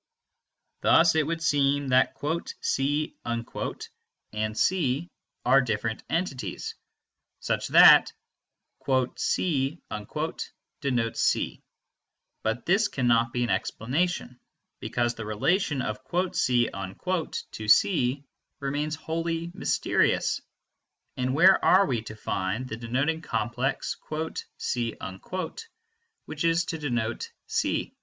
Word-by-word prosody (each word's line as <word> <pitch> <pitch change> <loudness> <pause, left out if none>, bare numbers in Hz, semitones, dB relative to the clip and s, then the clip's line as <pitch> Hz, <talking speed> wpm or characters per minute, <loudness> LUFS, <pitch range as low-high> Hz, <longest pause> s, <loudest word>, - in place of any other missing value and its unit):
Thus 165 0 +5
it 160 -2 +2
would 165 0 -2
seem 140 -2 +2
that 130 0 +3 0.4
"C" 145 +3 0
and 110 -2 -5
C 170 -2 +1 0.4
are 135 +2 +6
different 110 -2 -2
entities, 135 - -3 0.7
such - - -1
that - - +8 1.1
"C" 150 -2 0 1.0
denotes 120 -5 0
C; - - +1 0.8
but 110 +2 -2
this 200 +5 +3
cannot 115 - +2
be 120 0 0
an 120 - 0
explanation, 135 0 -1 0.4
because 120 -1 -1
the 115 - -7
relation 135 - 0
of 110 -2 -3 0.4
"C" 120 -2 +3
to 110 - -4
C 135 - +4 0.4
remains 145 +2 -2
wholly 165 +1 -3
mysterious; - - +1 0.7
and 130 +1 -1
where 185 +5 +6
are 195 +2 +6
we 120 -5 -1
to 110 0 -9
find 105 +3 -2
the 110 - -5
denoting 135 +8 -1
complex 125 +1 -2 0.6
"C" 120 -3 -2 1.3
which - - -5
is 165 +1 +2
to 165 - -4
denote 120 -6 -2
C? - - -1
130 Hz, 100 wpm, -27 LUFS, 115-160 Hz, 1.3 s, that